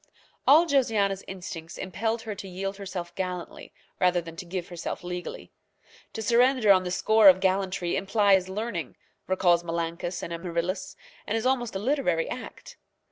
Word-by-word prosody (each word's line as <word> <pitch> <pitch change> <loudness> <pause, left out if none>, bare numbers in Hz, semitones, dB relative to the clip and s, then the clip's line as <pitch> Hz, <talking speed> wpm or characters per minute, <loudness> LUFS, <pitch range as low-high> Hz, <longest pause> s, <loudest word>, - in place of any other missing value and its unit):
All 310 +5 +7
Josiana's 220 - +1
instincts 175 -3 -7
impelled 220 +5 -2
her 220 -2 -4
to 195 -1 -8
yield 195 +2 -4
herself 185 -3 -6
gallantly 180 -1 -5 0.3
rather 180 -1 +3
than 165 -1 -8
to 180 - -6
give 175 0 -4
herself 175 0 -5
legally. 180 0 -6 0.6
To 220 - -4
surrender 240 0 +4
on 185 -1 +5
the 180 - -3
score 215 +3 +6
of 185 0 +5
gallantry 190 -2 0
implies 195 -2 +3
learning, 190 - -4 0.3
recalls 175 -2 +3
Menalcas 170 +1 -3
and 170 - -4
Amaryllis, 170 +2 -3 0.3
and 220 - 0
is 225 - -3
almost 245 -5 0
a - - +1
literary 210 - 0
act. 250 - -8
190 Hz, 155 wpm, -27 LUFS, 175-220 Hz, 0.6 s, All